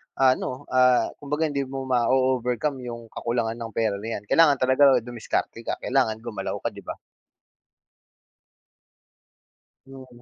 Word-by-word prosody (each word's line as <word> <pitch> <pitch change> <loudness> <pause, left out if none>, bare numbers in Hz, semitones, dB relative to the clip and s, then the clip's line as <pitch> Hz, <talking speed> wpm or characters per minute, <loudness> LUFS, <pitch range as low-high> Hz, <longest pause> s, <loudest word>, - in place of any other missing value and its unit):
ano, 130 +1 +1
ah, 125 -2 +4
kumbaga 150 +2 -1
hindi 140 -1 -1
mo 135 0 -5
mao-overcome 130 +2 +1
yung 115 -1 -7
kakulangan 115 -1 -2
ng 115 -1 -6
pera 110 -3 +1
na 110 - -7
yan - - -22
kailangan 160 -4 +5
talaga 130 +2 +3 0.2
dumiskarte 115 -1 -4
ka, - - 0
kailangan 125 -4 +1
gumalaw 105 -5 -4
ka - - -1
di - - -11
ba? - - -6 2.9
Mm. 130 -2 -13
125 Hz, 130 wpm, -25 LUFS, 115-135 Hz, 2.9 s, kailangan